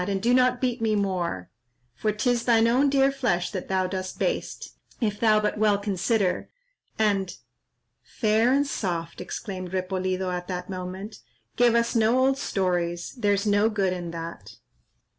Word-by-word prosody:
and 195 -1 0
do 235 +5 +2
not 250 -1 +3
beat 250 -2 -1
me 220 -1 +2
more, 180 - -2 0.4
For 215 - -1
'tis 235 +3 0
thine 230 -2 +4
own 260 +5 +3
dear 275 0 +3
flesh 245 -11 -1
that 185 -4 -5
thou 190 -1 +1
dost 185 0 -4
baste, - - -3 0.3
If 210 -4 -1
thou 215 -2 +4
but 210 0 -1
well 210 -2 +4
consider, 200 -1 0 0.5
and—" 200 -4 0 0.6
"Fair 220 +1 +1
and 280 +2 +3
soft," 175 -11 -3
exclaimed 185 0 -6
Repolido, 185 0 -1
at 180 0 -4
that 180 0 -5
moment, 185 +3 -6 0.4
"give 240 -1 +4
us 235 0 +2
no 225 +2 +3
old 265 +1 +2
stories, 175 -5 -1
there's 205 -5 0
no 205 +1 +3
good 195 -4 0
in 175 -2 -5
that. 165 0 -8
205 Hz, 160 wpm, -25 LUFS, 185-230 Hz, 0.6 s, thine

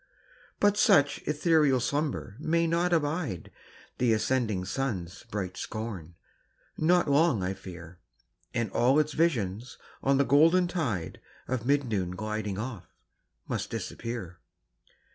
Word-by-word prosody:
But 205 0 +3
such 145 -7 +4
ethereal 150 -3 +3
slumber 145 -5 -2
may 165 +2 +1
not 170 +1 +2
bide 145 - -3 0.5
The 120 -2 +3
ascending 110 -4 0
sun's 95 -6 -3
bright 95 -3 -4
scorn 100 -7 -6 0.6
not 175 +2 +3
long, 145 - +3
I 95 +1 -1
fear; 90 -2 -11 0.5
And 115 -4 -2
all 130 +4 +3
its 155 -1 +2
visions 120 - 0 0.2
on 135 0 +3
the 140 - +3
golden 165 +6 +5
tide 125 - -3 0.3
Of 125 -2 -2
mid 145 0 +3
noon 95 -7 -2
gliding 105 -1 -3
off, 110 -3 -5 0.6
must - - -3
disappear. 110 -8 -5
125 Hz, 125 wpm, -28 LUFS, 100-150 Hz, 0.6 s, golden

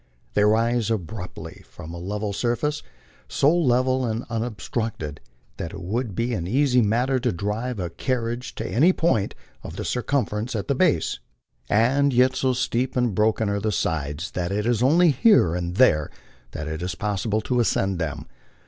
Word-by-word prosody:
They 105 - +3
rise 115 +2 +2
abruptly 100 -3 -5
from 80 +2 -10
a 85 - -6
level 105 +3 -3
sur 120 +3 0
face 150 +3 -2 0.5
so 150 +5 +3
level 130 -4 +2
and 115 0 -2
unobstructed 110 - -3 0.4
that 85 - -5
it - - -7
would 105 +4 -3
be 120 +1 -1
an 85 -6 -3
easy 125 +3 +3
matter 125 +5 +1
to 125 -1 0
drive 105 +6 -3
a 90 -2 -3
car 125 +8 -1
riage 120 +2 -5
to - - -4
any 160 +10 +4
point 140 - +1 0.3
of - - -8
the - - -5
circumference 120 -3 -1
at 100 - -3
the - - +2
base; 150 - +1 0.5
and 135 +6 +3
yet 130 +1 +4
so 130 -1 +1
steep 125 0 -1
and 120 -4 +1
broken 110 +2 +2
are 100 0 0
the 110 +1 -1
sides 80 -2 -2
that 90 0 -3
it 105 +2 -1
is 120 -2 +1
only 160 +6 +5
here 140 - +4
and 90 0 -3
there 75 - +4 0.4
that 75 - -5
it 80 +1 -4
is 90 0 -3
possible 105 +2 -1
to 125 +3 0
ascend 95 -5 +1
them. 80 -5 -3
115 Hz, 180 wpm, -24 LUFS, 95-125 Hz, 0.5 s, only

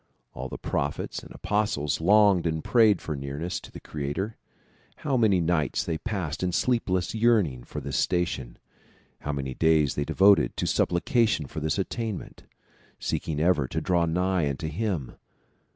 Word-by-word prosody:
All 65 +1 -6
the - - -6
prophets - - -3
and - - -13
apostles 105 -9 -1
longed 100 -1 +5
and 80 -1 -2
prayed 110 -4 +4
for 75 - -4
nearness 70 +5 -4
to - - -13
the - - -9
creator. 75 +9 -4 0.7
How 140 -3 +1
many 110 -6 +4
nights 80 -4 +1
they 80 -2 -3
passed 95 -9 -3
in 90 -1 0
sleepless 95 -6 0
yearning 105 - +2
for - - -6
this - - -3
station; 85 -9 -1 0.6
how 75 - -3
many 70 -2 -3
days 80 -1 +3
they 70 - -1
devoted 95 +7 +4
to - - -1
supplication 100 - +1
for 80 - -6
this 80 +4 -1
attainment, 105 +1 -4 0.5
seeking 75 -2 -2
ever 80 -5 +2
to - - -2
draw 85 -2 +1
nigh 90 -2 +1
unto 75 +3 -3
him 85 - -3
85 Hz, 155 wpm, -26 LUFS, 75-100 Hz, 0.7 s, longed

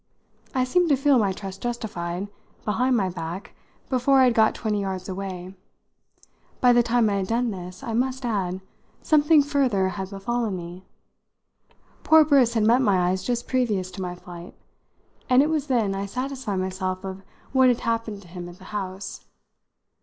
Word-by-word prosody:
I 255 - +3
seemed 345 +7 +2
to 285 - +5
feel 275 -1 +3
my 200 -3 +2
trust 195 0 -7
justified, 200 -6 -4 0.4
behind 245 +4 +2
my 195 -3 +1
back, 175 +1 -6 0.3
before 265 +1 +3
I - - +7
had 250 -2 +4
got 220 -1 +3
twenty 210 -3 -1
yards 190 -2 -4
away. 185 -1 -6 1.1
By 245 -1 +5
the 240 - +5
time 235 -1 +2
I 200 -1 +1
had 190 -1 -2
done 235 +2 0
this, 180 +2 -8
I 230 -4 -4
must 260 +2 -1
add, 190 -5 -1 0.4
something 300 0 +5
further 260 -10 +1
had 190 0 -5
befallen 210 +1 -2
me. 175 +2 -9 1.2
Poor 315 -1 +6
Briss 260 -6 +4
had 220 - +2
met 235 +4 +4
my 185 -6 +3
eyes 185 0 -1
just 240 -1 -2
previous 215 -8 0
to 190 - -7
my 180 -1 -4
flight, 175 0 -11 0.7
and 255 +2 +6
it 305 - 0
was 300 -2 -1
then 230 -7 +1
I 195 +1 -3
satisfied 255 -1 -4
myself 185 0 -3
of 190 0 -6 0.3
what 260 -1 +5
had 245 -2 +2
happened 230 -3 -2
to - - -16
him 175 0 -8
at 175 - -13
the 185 - -16
house. 195 -1 -5
210 Hz, 175 wpm, -24 LUFS, 185-250 Hz, 1.2 s, I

